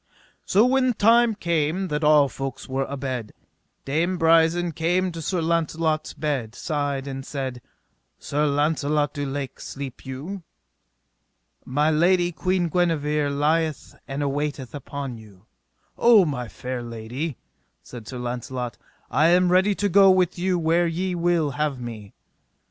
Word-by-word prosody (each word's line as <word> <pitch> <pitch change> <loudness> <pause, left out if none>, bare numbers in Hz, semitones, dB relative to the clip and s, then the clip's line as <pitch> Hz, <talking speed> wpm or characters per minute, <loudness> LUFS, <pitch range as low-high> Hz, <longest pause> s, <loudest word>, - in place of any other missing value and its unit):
So 210 +4 +4
when 255 0 +3
time 230 +2 +4
came 170 0 -1
that 150 +1 -2
all 150 -1 +6
folks 135 -1 -6
were 135 0 -1
abed, 130 -5 -5 0.5
Dame 165 +6 0
Brisen 165 +1 +3
came 175 +4 0
to 165 -1 -7
Sir 175 +2 -1
Launcelot's 160 -1 0
bed's 130 -7 -3
side 145 -3 -2
and 135 -1 -5
said: 130 -3 -5 0.6
Sir 150 +1 -1
Launcelot 145 0 +1
du 145 -2 -3
Lake, 135 -1 -5
sleep 135 -2 -7
you? 145 +10 -6 1.2
My 150 +4 +1
lady, 175 +3 +3
Queen 180 +1 0
Guenever, 150 -4 +1
lieth 155 +2 0
and 140 +1 -3
awaiteth 140 -2 -3
upon 140 -3 -6
you. 105 -3 -17 0.5
O 230 -5 +6
my 130 -6 -3
fair 125 +2 -5
lady, 120 +5 -5 0.5
said 115 -3 -10
Sir 130 - -6
Launcelot, 125 -2 -4 0.3
I 150 +6 +4
am 180 +1 +4
ready 190 +3 +4
to 205 - 0
go 195 +1 +6
with 185 -2 +3
you 185 0 +1
where 170 +1 +2
ye 180 +3 -2
will 170 -3 +1
have 145 -1 -2
me. 110 -4 -8
150 Hz, 140 wpm, -24 LUFS, 135-175 Hz, 1.2 s, all